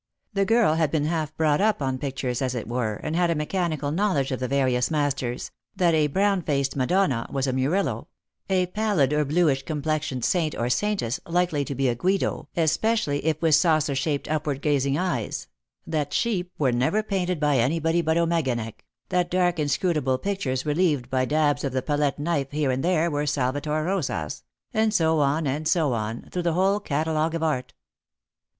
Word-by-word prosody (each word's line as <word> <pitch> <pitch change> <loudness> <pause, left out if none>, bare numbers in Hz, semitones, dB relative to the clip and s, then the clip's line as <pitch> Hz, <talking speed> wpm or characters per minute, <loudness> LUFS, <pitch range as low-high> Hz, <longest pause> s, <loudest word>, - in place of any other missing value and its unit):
The 195 0 +1
girl 225 -6 +4
had 160 -2 +1
been 150 -1 0
half 155 -1 -2
brought 155 -1 +2
up 215 +1 +2
on 130 -2 -2
pictures, 130 -3 -3
as 130 -1 -1
it 115 - -4
were, 120 -3 -1
and 155 +9 -4
had 175 0 +2
a 170 - +1
mechanical 155 -2 -1
knowledge 160 -7 0
of 130 - -2
the 130 - -2
various 130 -2 +1
masters 140 -5 -1
— - - -52
that 180 -3 +3
a 155 -1 +3
brown 195 +5 +1
faced 140 -4 -1
Madonna 135 -2 +1
was 135 -1 0
a 130 - -1
Murillo; 140 +10 0 0.4
a 185 -1 +2
pallid 180 -8 +1
or 150 0 +2
bluish 150 -2 +2
complexioned 150 -4 -2
saint 165 -4 +1
or 120 +1 -1
saintess 195 - 0
likely 170 -4 +1
to 140 - -4
be 135 +1 +1
a 120 - +2
Guido, 175 +2 -1
especially 160 -1 +1
if 155 0 0
with 160 -1 +4
saucer 155 -2 +3
shaped 140 +1 -1
upward 150 -3 -2
gazing 140 -2 +1
eyes; 170 - -2 0.4
that 150 -3 -2
sheep 185 -6 0
were 135 -4 +2
never 130 - +1
painted 185 -5 -1
by 145 -3 +2
anybody 165 +7 +1
but 160 0 +1
Ommeganek; 135 -10 -1 0.3
that 180 -1 +1
dark 180 -2 +1
inscrutable 145 -2 +1
pictures 145 -9 -2
relieved 150 -5 +1
by 130 -1 +1
dabs 150 +1 +1
of 135 -3 -2
the 130 -1 -1
palette 145 -2 0
knife 145 -3 -1
here 145 -2 0
and 130 +1 -2
there 170 -1 +2
were 145 0 -1
Salvator 145 +3 -1
Rosas; 155 - -2 0.3
and 220 0 +2
bo 160 -1 +2
on, 145 +3 +2
<md 145 +3 -1
so 160 -6 +2
on, 110 +1 -3
through 180 - -2
the 170 -1 0
whole 195 +4 +2
catalogue 160 -1 -1
of 165 - -2
art. 130 -5 -1
150 Hz, 185 wpm, -25 LUFS, 135-170 Hz, 0.4 s, girl